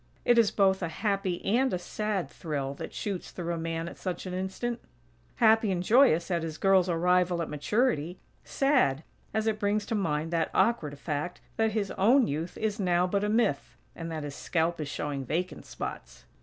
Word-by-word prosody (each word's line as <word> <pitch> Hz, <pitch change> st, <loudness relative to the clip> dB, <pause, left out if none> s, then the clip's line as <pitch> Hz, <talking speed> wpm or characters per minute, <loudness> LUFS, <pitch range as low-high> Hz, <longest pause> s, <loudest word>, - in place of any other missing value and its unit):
It 240 Hz, -1 st, +5 dB
is 225 Hz, -3 st, +5 dB
both 190 Hz, -1 st, +2 dB
a 170 Hz, -, -1 dB
happy 195 Hz, +1 st, -2 dB
and 250 Hz, +6 st, +2 dB
a -, -, 0 dB
sad 205 Hz, +1 st, -2 dB
thrill 140 Hz, -5 st, -4 dB
that -, -, -7 dB
shoots 195 Hz, -4 st, -4 dB
through 170 Hz, -1 st, -4 dB
a -, -, -3 dB
man 165 Hz, 0 st, -3 dB
at -, -, -8 dB
such 185 Hz, 0 st, -4 dB
an 185 Hz, -, -5 dB
instant. 190 Hz, +6 st, -3 dB, 0.6 s
Happy 220 Hz, -2 st, +4 dB
and 180 Hz, -1 st, -1 dB
joyous 215 Hz, -, +4 dB
at 170 Hz, -1 st, +1 dB
his 160 Hz, -1 st, -5 dB
girl's 190 Hz, -2 st, +4 dB
arrival 180 Hz, +1 st, +2 dB
at 165 Hz, -, -3 dB
maturity; 175 Hz, -, 0 dB, 0.3 s
sad, 255 Hz, -, +2 dB, 0.3 s
as 220 Hz, 0 st, -1 dB
it 220 Hz, -1 st, 0 dB
brings 205 Hz, 0 st, 0 dB
to -, -, -3 dB
mind 165 Hz, -6 st, -1 dB
that 165 Hz, -1 st, +1 dB
awkward 155 Hz, -12 st, +1 dB
fact 150 Hz, +4 st, -3 dB, 0.2 s
that 220 Hz, -1 st, +2 dB
his 205 Hz, -3 st, -1 dB
own 240 Hz, +6 st, +5 dB
youth 160 Hz, +5 st, -4 dB
is 215 Hz, 0 st, -2 dB
now 180 Hz, -2 st, +2 dB
but 200 Hz, +2 st, 0 dB
a 210 Hz, -, 0 dB
myth; 215 Hz, -10 st, 0 dB, 0.2 s
and 165 Hz, -1 st, -6 dB
that 155 Hz, -2 st, -4 dB
his 145 Hz, -1 st, -5 dB
scalp 165 Hz, +2 st, -1 dB
is 150 Hz, -, -3 dB
showing 145 Hz, -2 st, -3 dB
vacant 170 Hz, +8 st, -3 dB
spots. -, -, -7 dB
180 Hz, 195 wpm, -28 LUFS, 165-210 Hz, 0.6 s, It